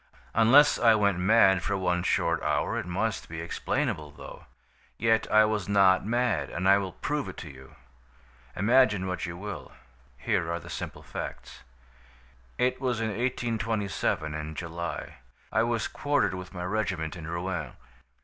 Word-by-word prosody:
Unless 130 +7 +6
I 115 -2 +6
went 100 -4 +2
mad 95 -1 +5
for 100 +2 -1
one 90 -2 0
short - - +1
hour - - 0
it - - -6
must 105 +5 -2
be 80 0 -6
explainable, 85 - -2
though. 75 - -12 0.5
Yet 115 0 +1
I 110 0 +6
was 105 -2 -2
not 95 -2 +5
mad, 115 - 0
and 95 +2 -2
I 100 +1 +6
will 95 -3 -5
prove 150 -1 -3
it - - -10
to 80 - -8
you. 65 -1 -15 0.8
Imagine 105 -1 +3
what 90 -2 -3
you 85 0 -6
will. 95 -4 -7 0.4
Here 85 - -1
are 85 - -2
the - - -11
simple - - -6
facts: - - -7 1.0
"It 125 +1 0
was 125 -4 0
in 115 -1 -1
1827, 110 -8 -1
in 75 0 -5
July. 85 +1 -5 0.3
I 110 - +2
was 115 -1 0
quartered 145 -7 0
with 90 0 -7
my 90 -2 -6
regiment 95 -5 -2
in 80 -3 -8
Rouen. 85 +2 -3
100 Hz, 160 wpm, -28 LUFS, 85-115 Hz, 1.0 s, Unless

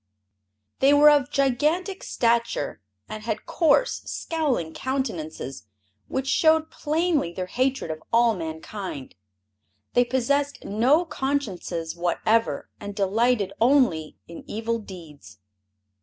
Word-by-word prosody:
They 275 +2 +5
were 295 +1 +8
of 290 -2 +3
gigantic 300 +8 0
stature 235 - 0 0.3
and 215 - -7
had 215 -1 -4
coarse, 335 +9 +2
scowling 275 - -2
countenances 165 - -4 0.4
which 265 0 -2
showed 315 +2 +3
plainly 310 - 0
their 185 +1 -4
hatred 255 -2 -1
of 155 0 -6
all 235 0 +4
mankind. 160 -2 -6 0.8
They 245 - +5
possessed 280 +3 -1
no 255 - +3
consciences 200 - -3
whatever 215 +6 0
and 205 -1 -7
delighted 205 0 +1
only 235 - +3
in 170 - -10
evil 230 +2 -2
deeds. 160 - -12
235 Hz, 110 wpm, -25 LUFS, 180-280 Hz, 0.8 s, were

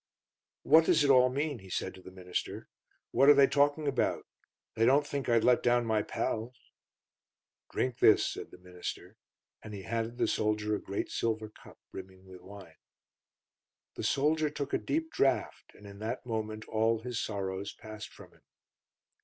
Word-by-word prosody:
"What 160 +2 +6
does 160 -4 +4
it 140 - +4
all 130 -1 +6
mean?" 140 0 -2
he 95 -1 -14
said - - -3
to 95 - -14
the 95 - -11
minister. 90 -1 -5 0.4
"What 135 +4 +5
are 145 - +9
they 140 0 +7
talking 145 +2 +1
about? 135 -3 0 0.5
They 115 - 0
don't 140 +5 +4
think 140 -3 -4
I'd 115 -1 +3
let 125 -1 +4
down 120 0 +2
my 110 -1 +1
pals?" 115 +4 -3 1.1
"Drink 125 -2 -2
this," - - +6
said - - -6
the - - -14
minister, 90 0 -8 0.5
and 105 -1 -9
he 95 - -8
handed 115 +2 -3
the - - +1
soldier 105 0 0
a 105 - -2
great 100 - -4
silver 110 -1 -2
cup, - - -17
brimming 95 0 -11
with 95 -1 -13
wine. 95 -5 -13 1.2
The - - -7
soldier 150 +2 +1
took 140 -1 -5
a - - +2
deep 320 +1 -2
draught, 135 - 0
and 105 - -16
in 100 0 -11
that 115 +4 -4
moment 110 -2 -4
all 110 0 +1
his 120 -1 -3
sorrows 95 -1 -4
passed 110 0 -9
from - - -15
him. - - -25
115 Hz, 175 wpm, -30 LUFS, 100-135 Hz, 1.2 s, are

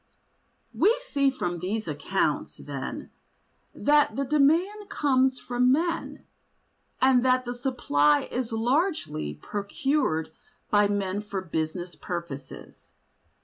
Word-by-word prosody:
We 455 +4 +3
see 280 - +2
from 175 -10 -3
these 210 +5 -3
accounts, - - -1
then, - - -6 0.6
that 295 -6 +3
the 275 +1 -1
demand 335 +9 +2
comes 265 -7 +2
from 250 +1 +2
men, 335 +4 -1 0.7
and 260 -2 +4
that 255 0 +3
the 245 - -3
supply 150 - +2
is 245 -1 -4
largely 230 - 0
procured 200 - -1 0.4
by 205 -1 +5
men 200 -1 -1
for 205 -2 -4
business 170 0 -3
purposes. 150 -5 -8
245 Hz, 105 wpm, -26 LUFS, 180-275 Hz, 0.7 s, by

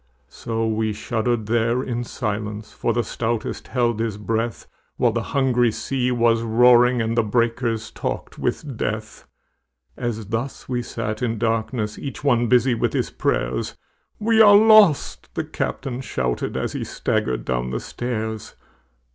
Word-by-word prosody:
So 115 -1 -3
we 110 -1 0
shuddered 115 +1 -1
there 115 +3 +1
in 120 -1 -3
silence, 105 -1 -4
For - - -1
the 120 - 0
stoutest 115 +1 -3
held 120 -3 0
his 110 -3 -2
breath, 115 +1 -2 0.3
While 120 - +3
the 115 +1 -1
hungry 125 -2 +2
sea 125 +2 -1
was 115 -1 +3
roaring 120 +1 +5
And 115 +1 -1
the 120 - +4
breakers 115 0 0
talked - - -5
with 140 -6 -3
death. 110 0 -4 0.7
As 115 -3 -3
thus 120 +4 -4
we 125 -1 -1
sat 110 -2 -4
in 115 -2 -1
darkness 110 -1 -1
Each 140 0 -6
one 120 -4 +3
busy 125 +1 +4
with 115 - 0
his - - -1
prayers, - - -1 0.4
"We 220 +1 +3
are 205 -2 +8
lost!" 215 -7 +5
the - - -1
captain 130 -2 -4
shouted, 60 - -2
As - - -2
he - - -3
staggered 65 -1 -1
down 60 0 -1
the 60 - -2
stairs. 110 -3 -4
115 Hz, 150 wpm, -22 LUFS, 110-125 Hz, 0.7 s, are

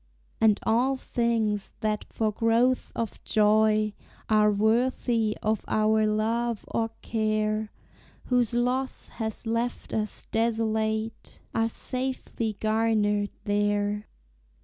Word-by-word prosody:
And 220 -2 +4
all 255 +4 +2
things 225 -5 -1
that 215 -1 -1
for 220 -1 0
growth 230 +4 +2
of 230 -2 -4
joy 215 0 +3 0.4
Are 215 -1 +5
worthy 225 +1 +1
of 215 0 0
our 215 0 +3
love 225 +2 0
or 225 0 0
care, 215 -1 0 0.6
Whose 245 -2 +1
loss 250 +2 -1
has 220 0 -4
left 230 +2 -2
us 215 -1 -2
desolate, 220 -1 -1
Are 225 0 +1
safely 250 -4 -3
garnered 215 -2 +1
there. 205 0 0
220 Hz, 105 wpm, -27 LUFS, 215-230 Hz, 0.6 s, Are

